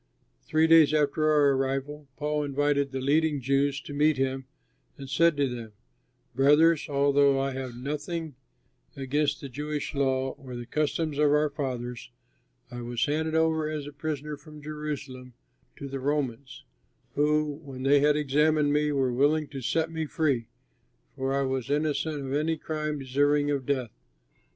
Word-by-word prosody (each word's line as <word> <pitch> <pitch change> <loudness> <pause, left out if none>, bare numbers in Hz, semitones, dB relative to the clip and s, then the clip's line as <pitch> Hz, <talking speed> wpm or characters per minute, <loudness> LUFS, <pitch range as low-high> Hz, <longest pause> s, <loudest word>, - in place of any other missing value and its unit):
Three 155 +1 +3
days 160 -2 +6
after 155 +1 +2
our 145 -2 +4
arrival, 135 +2 -2
Paul 150 0 -1
invited 140 0 +1
the 135 0 -4
leading 150 +2 +2
Jews 140 +2 +1
to 145 - -9
meet 150 0 +3
him 135 0 -1 0.5
and 135 -2 -8
said 160 +4 +3
to 140 -1 +2
them, 120 -3 -7 0.6
"Brothers, 150 +5 +4
although 140 -1 +3
I 135 0 -1
have 130 -2 -5
done 120 +1 -10
nothing 150 +2 -4 0.6
against 140 +2 -1
the 140 - -6
Jewish 150 +3 -4
law 135 -1 +1
or 130 -2 -9
the 120 0 -6
customs 155 +1 -1
of 150 -1 +4
our 150 0 +2
fathers, 125 -4 -5 0.6
I 120 - -6
was 120 0 -1
handed 160 +2 -1
over 160 -1 +2
as 155 -2 -4
a 145 - -9
prisoner 150 0 -4
from 150 0 -13
Jerusalem 145 -4 -6 0.4
to 140 - -7
the 135 0 -5
Romans, 135 -2 -3 0.5
who, 150 0 +1
when 130 -2 -8
they 140 +1 +5
had 145 +1 +3
examined 150 +1 +2
me, 150 0 +2
were 135 -3 +1
willing 145 +4 +2
to 140 -2 -7
set 160 +6 0
me 160 -1 -3
free, 140 -8 0 0.7
for 135 0 -2
I 140 0 +1
was 130 -1 -2
innocent 150 0 -1
of 135 - -4
any 155 +2 0
crime 155 -1 -3
deserving 145 +2 +1
of 135 -3 -2
death. 130 -5 -1
145 Hz, 165 wpm, -27 LUFS, 135-150 Hz, 0.7 s, days